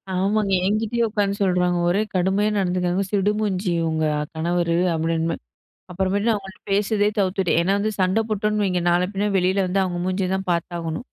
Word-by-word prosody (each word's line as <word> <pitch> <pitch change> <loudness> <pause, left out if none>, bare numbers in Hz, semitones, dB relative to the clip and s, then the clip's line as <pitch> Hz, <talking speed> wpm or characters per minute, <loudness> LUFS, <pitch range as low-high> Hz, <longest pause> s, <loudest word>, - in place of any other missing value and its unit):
ஆமாங்க, 200 +2 +1
என்கிட்டேயே 225 +3 +1
உட்கார்ந்து 200 -2 0
சொல்றாங்க. 180 -1 +2
ஒரே 195 +4 +2
கடுமையா 190 +3 +2
நடந்துக்கிறாங்க. 180 0 0
சிடுமூஞ்சி 200 -2 0 0.2
உங்க 160 -1 0 0.3
கணவரு. 170 +1 0 0.2
அப்பிடின்றமாரி 165 +1 0 0.6
அப்புறமேட்டு 190 +3 -1
நான் 220 - +3
அவுங்கள்ட்ட 195 0 -12
பேசுறதே 205 +1 +2
தவிர்த்துட்டேன். 185 -3 +1
ஏன்னா, 190 +3 +1
வந்து 215 +1 0
சண்ட 185 +3 +2
போட்டோன்னு 210 0 0
வைங்க. 180 -2 0
நாள 175 +1 +3
பின்ன 200 +1 -1
வெளில 190 +1 +2
வந்து 195 +2 +1
அவங்க 175 -1 -3
மூஞ்சிய 185 0 -1
தான் 190 -1 -6
பார்த்தாகணும் 170 +3 -3
190 Hz, 155 wpm, -22 LUFS, 175-205 Hz, 0.6 s, நான்